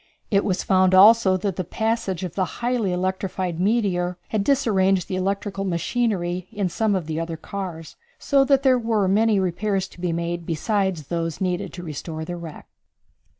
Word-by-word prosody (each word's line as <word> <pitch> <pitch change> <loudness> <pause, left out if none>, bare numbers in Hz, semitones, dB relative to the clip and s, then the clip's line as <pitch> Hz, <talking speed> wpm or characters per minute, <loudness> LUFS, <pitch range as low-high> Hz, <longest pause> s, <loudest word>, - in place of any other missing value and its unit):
It 200 -1 +3
was 185 -3 -1
found 185 0 +3
also 200 -1 +7
that 190 -1 -3
the 185 - -1
passage 200 -1 -2
of 180 - -4
the 190 - 0
highly 240 -5 0
electrified 185 -1 -2
meteor 185 -4 +1
had 215 -2 0
disarranged 195 -8 +2
the 185 - -3
electrical 195 +1 -2
machinery 185 -1 -1
in 205 -4 -1
some 215 +3 0
of 180 -4 -2
the 160 0 -3
other 165 0 -4
cars, 170 -2 -7 0.2
so 275 -2 +3
that 275 0 +3
there 260 -2 +4
were 225 -4 +1
many 210 +2 +3
repairs 190 +1 -1
to 175 - -15
be 180 -2 0
made 170 +1 -3
besides 190 +1 -1
those 165 -2 -2
needed 180 -2 -2
to 175 0 -7
restore 160 0 -6
the 175 - -5
wreck. 170 -3 -9
190 Hz, 175 wpm, -23 LUFS, 175-210 Hz, 0.2 s, also